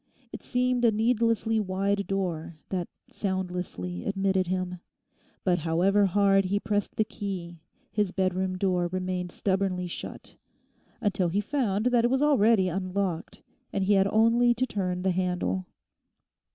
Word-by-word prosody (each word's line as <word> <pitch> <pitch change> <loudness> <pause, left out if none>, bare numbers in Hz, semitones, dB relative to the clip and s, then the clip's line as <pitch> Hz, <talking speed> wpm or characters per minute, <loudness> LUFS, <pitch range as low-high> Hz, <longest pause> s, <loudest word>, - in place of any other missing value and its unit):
It - - -7
seemed 250 -1 0
a 230 - +6
needlessly 225 0 +1
wide 200 0 -1
door 170 -4 -3
that 180 -3 -2 0.2
soundlessly 180 - -3
admitted 195 -2 0
him. 180 0 -2 0.6
But 180 -2 +2
however 185 +6 +3
hard 195 0 +3
he 200 +2 0
pressed 205 -1 -2
the 220 - +3
key 190 -6 -6 0.3
his 210 -3 0
bedroom 185 0 0
door 180 -2 +1
remained 185 0 -3
stubbornly 190 -2 0
shut 175 - -7 0.7
until 195 -4 +1
he 190 +5 0
found 210 -2 0
that 235 -1 +4
it 240 - +3
was 265 +3 +2
already 230 -9 +4
unlocked 185 -1 -3 0.3
and 195 - 0
he 200 +2 +3
had 195 0 +4
only 230 +3 +4
to 255 +3 +1
turn 180 -6 -2
the 190 - +2
handle. 180 - -1
195 Hz, 140 wpm, -27 LUFS, 180-210 Hz, 0.7 s, a